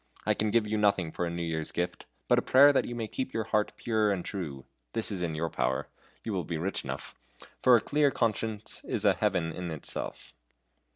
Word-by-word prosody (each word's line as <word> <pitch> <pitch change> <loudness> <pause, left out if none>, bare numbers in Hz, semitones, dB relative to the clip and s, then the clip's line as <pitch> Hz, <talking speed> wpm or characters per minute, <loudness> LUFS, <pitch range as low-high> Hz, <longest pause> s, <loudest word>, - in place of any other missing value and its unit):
I - - +4
can 110 - +2
give 115 0 +3
you 105 0 -1
nothing 100 -6 +2
for 90 - -2
a - - -2
New 85 0 -3
Year's 80 -1 -3
gift, 90 0 -3 0.2
but - - +5
a - - -1
prayer 140 +2 +7
that - - +2
you 120 - -5
may 115 -2 -3
keep 130 +4 -4
your 110 - +1
heart 105 -1 0
pure 110 -3 +1
and 95 -3 -2
true 75 -9 -5 0.3
this 115 -1 -1
is 95 -3 -3
in 85 -3 -1
your 80 +1 -2
power - - -1 0.3
you 110 - -3
will 90 -3 -1
be 80 +1 -3
rich 95 +5 -2
enough - - -5 0.5
for 125 -2 +7
a - - -1
clear 145 +4 +3
conscience 110 -3 -2
is 110 - -2
a 100 - +6
Heaven 90 -4 0
in 90 +1 -5
itself." 80 -3 -6
105 Hz, 225 wpm, -29 LUFS, 85-110 Hz, 0.5 s, prayer